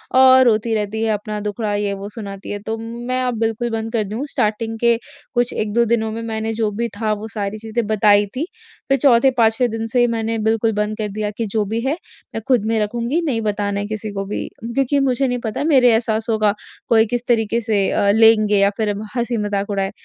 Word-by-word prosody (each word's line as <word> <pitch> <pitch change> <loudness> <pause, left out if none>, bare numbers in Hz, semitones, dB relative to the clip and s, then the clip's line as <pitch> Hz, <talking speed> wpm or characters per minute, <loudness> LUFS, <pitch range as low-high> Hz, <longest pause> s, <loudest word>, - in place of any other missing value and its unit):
औ 260 0 +7
रोती 225 -1 +2
रहती 210 +1 -2
है 225 - +1
अपना 210 0 -4
दुखड़ा 210 +1 -2
ये 205 -1 -1
वो 200 +1 -6
सुनाती 200 -3 -8
है। 205 - -3
तो 225 0 -2
मैं 240 +3 -3
अब 250 -3 -1
बिल्कुल 225 +1 -1
बंद 225 0 -3
कर 225 -2 +1
दूँ। 215 +7 -4
स्टार्टिंग 225 -1 -1
के 235 0 +3 0.4
कुछ 240 0 +1
1-2 220 +2 +1
दिनों 220 -1 0
में 225 +1 -5
मैंने 220 0 -3
जो 220 -1 0
भी 235 +3 -2
था 215 -1 +1
वो 210 +1 -6
सारी 205 -1 -3
चीजें 225 +1 -3
बताई 210 -1 +4
थी 280 +5 -1 0.4
फ़िर 275 0 +3
चौथे-पाँचवें 245 -3 +4
दिन 225 0 -3
से 240 +1 +2
मैंने 225 -1 -1
बिल्कुल 225 0 +1
बंद 210 0 -1
कर 215 - -2
दिया 210 +1 -2
कि 230 - -1
जो 210 +1 -1
भी 225 - 0
है 270 +4 0 0.4
मैं 225 - -2
ख़ुद 245 -5 +3
में 225 0 +1
रखूँगी 235 +9 -1
नहीं 245 -7 0
बताना 205 -1 -1
किसी 215 0 -4
को 195 0 -3
भी 200 - -4 0.3
क्योंकि 275 +2 +1
मुझे 270 0 +1
नहीं 245 -1 -1
पता 220 +4 -2
मेरे 265 -6 +5
एहसासों 225 0 0
का 210 -1 +3 0.4
कोई 225 -1 +5
किस 240 +2 -3
तरीके 230 -1 +2
से 220 -2 0
अ, 200 - +2
लेंगे 215 -1 +5
या 200 0 +4
फ़िर 215 -2 0 0.2
हँसी-मज़ाक 210 -4 -1
उड़ाए। 195 -1 -1
225 Hz, 215 wpm, -20 LUFS, 210-235 Hz, 0.4 s, औ